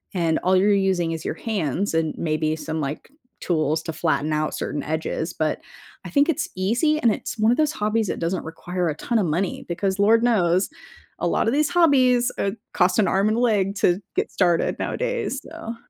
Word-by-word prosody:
and 165 -3 +1
all 185 +1 +2
you're 200 +3 +4
using 190 -4 +1
is 165 0 -5
your - - -3
hands 200 - -2
and 160 -1 0
maybe 155 -1 0
some, 160 0 -4
like, 145 +1 -5 0.3
tools 155 -2 0
to 160 - -5
flatten 155 -1 0
out 155 0 -1
certain 150 - -3
edges, 160 +1 -3
but 155 -1 -1 0.5
I - - -6
think 285 +1 +3
it's 325 - -1
easy 240 - +1
and 230 -7 +3
it's - - -6
one 215 +1 +3
of 245 - +1
those 305 -1 +2
hobbies 215 -5 0
that - - -3
doesn't 170 +2 -2
require 175 +2 -3
a 150 - -3
ton 230 +8 -1
of 200 - +1
money 175 +5 -2
because 190 +3 -2
lord 225 +3 +4
knows 185 -6 +2 0.5
a - - 0
lotta 225 - +1
these 295 +4 +2
hobbies, 260 -8 +4
uh, 195 - +1 0.2
cost 180 +1 +2
an 205 - +3
arm 195 +3 +2
and 220 - 0
leg 205 -5 +1
to 180 -2 +2 0.2
get - - -1
started 175 -3 +1
nowadays - - -2
so 230 +1 -7
190 Hz, 200 wpm, -23 LUFS, 160-225 Hz, 0.5 s, you're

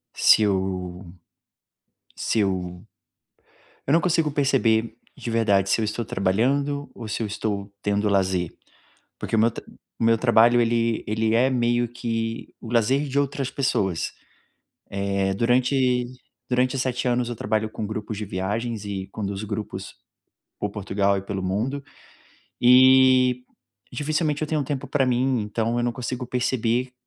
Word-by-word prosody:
se 110 - +6
eu 95 -2 -2 1.1
se 110 - 0
eu 90 -2 -2 1.0
eu 140 - +2
não 165 - +5
consigo 165 -3 +1
perceber, 115 -6 +1 0.2
de - - -6
verdade, 100 -4 +2
se - - +3
eu 110 - 0
estou 110 +3 -2
trabalhando 135 +10 0
ou 115 - -7
se 105 - -3
eu 110 - -1
estou 100 -1 -3
tendo 105 +1 +1
lazer, 95 -3 +1 0.7
porque - - -4
o - - +2
meu 115 +2 +4
tra - - -9 0.4
o - - +1
meu 115 0 +4
trabalho 120 0 +5
ele 115 -1 +1
ele 110 +1 0
é 125 +3 +4
meio 120 -1 +1
que 115 -1 -4
o 115 - -9
lazer 125 +5 +2
de 135 - -4
outras 140 -1 -1
pessoas. 95 - -1 1.0
Eh, 100 -1 0
durante 125 +3 +2 0.4
durante 125 +1 +1
7 130 -1 -1
anos 120 0 +1
eu 120 - -4
trabalho 110 0 -1
com 110 0 -5
grupos 110 0 -5
de 105 - -4
viagens 105 +4 -3
e 95 -2 -4
conduzo 100 0 -4
grupos 105 0 -5 0.6
por 105 - -2
Portugal 100 -1 0
e - - -3
pelo 100 -1 -4
mundo, 115 +10 -2 0.8
e 130 0 +6 0.5
dificilmente 150 0 -1
eu - - 0
tenho 155 -1 0
tempo 135 -1 -4
pra 140 -3 +1
mim, 125 0 +1
então 110 +2 -1
eu 120 - 0
não 120 - 0
consigo 125 +1 -4
perceber, 125 0 0
115 Hz, 150 wpm, -24 LUFS, 105-130 Hz, 1.1 s, se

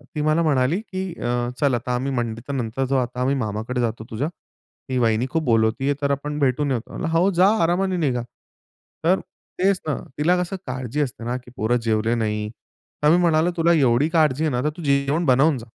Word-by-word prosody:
ती 150 - -1
मला 155 +2 +2
म्हणाली, 145 +2 +2
की 190 -3 -5 0.2
अ, 120 0 -1
"चल, 140 -3 +3
आता 125 +1 -2
आम्ही 130 +3 -2
मंडी 115 -3 -2
तर 140 - -3
नंतर 125 0 -2
जाऊ, 135 +1 +1
आता 125 0 -3
आम्ही 135 +2 +2
मामाकडे 110 +1 -2
जातो 115 -1 -2
तुझ्या, 130 +8 -2 0.6
ती 130 - -1
वाहिनी 115 0 +2
खूप 160 -1 0
बोलवतीये, 115 +3 +2
तर 140 0 +1
आपण 145 +2 -2
भेटून 140 +1 +1
येतो." 120 -3 -3
म्हणलं, 170 - -3
"हो, 180 +4 +4
जा 180 +1 +4 0.2
आरामाने 180 +2 +1
निघा." 130 -8 0 0.8
तर 180 +4 +3 0.4
तेच 190 0 +3
ना, 150 - 0 0.2
तिला 165 +5 +3
कसं 180 +2 -3
काळजी 130 +2 -3
असते 125 -5 -3
ना, 120 +1 -1
की 125 -1 -14
पोरं 115 +3 +1
जेवले 110 0 +1
नाही. 105 -2 -1 0.5
तर 150 - +6
मी - - +4
म्हणालो, 165 0 +3
"तुला 170 +1 +4
एवढी 135 -2 +3
काळजी 155 -3 +2
आहे 155 - +1
ना, 125 -1 0
तर 150 - +2
तू 170 - -7
जेवण 140 +3 +1
बनवून 135 +2 +4
जा." 115 - -9
135 Hz, 210 wpm, -22 LUFS, 120-155 Hz, 0.8 s, तर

